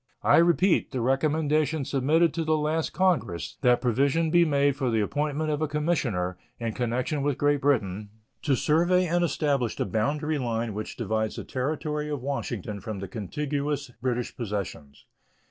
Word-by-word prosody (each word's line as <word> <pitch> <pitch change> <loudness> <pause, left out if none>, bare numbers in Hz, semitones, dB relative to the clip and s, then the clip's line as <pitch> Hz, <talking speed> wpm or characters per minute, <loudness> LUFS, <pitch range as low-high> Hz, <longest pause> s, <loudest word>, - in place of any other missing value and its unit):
I - - +5
repeat 175 +2 +3
the 130 - -3
recommendation 150 +3 +1
submitted 150 +5 +2
to 165 +1 -1
the 155 0 +2
last 155 +1 0
Congress, 130 - 0
that 125 -1 +4
provision 140 +6 +2
be 175 0 +5
made 140 -2 +2
for 135 -3 -1
the 115 -1 +1
appointment 150 +7 -1
of 150 0 -1
a 155 - +1
commissioner, 130 - -1 0.2
in 115 -2 -2
connection 125 +5 -1
with 145 -1 0
Great 145 -1 +2
Britain, 105 -7 0 0.3
to 140 -3 +2
survey 175 +7 +3
and 175 +1 +1
establish 140 -8 0
the - - -1
boundary 145 - -1
line 115 -3 -2
which 105 +1 -6
divides 110 0 -1
the - - -5
Territory 150 +3 -2
of 145 -4 -4
Washington 115 -7 -4
from 110 +1 -5
the 95 0 -5
contiguous 140 - -3
British 125 -1 -2
possessions. 100 - -5
140 Hz, 165 wpm, -27 LUFS, 115-155 Hz, 0.3 s, I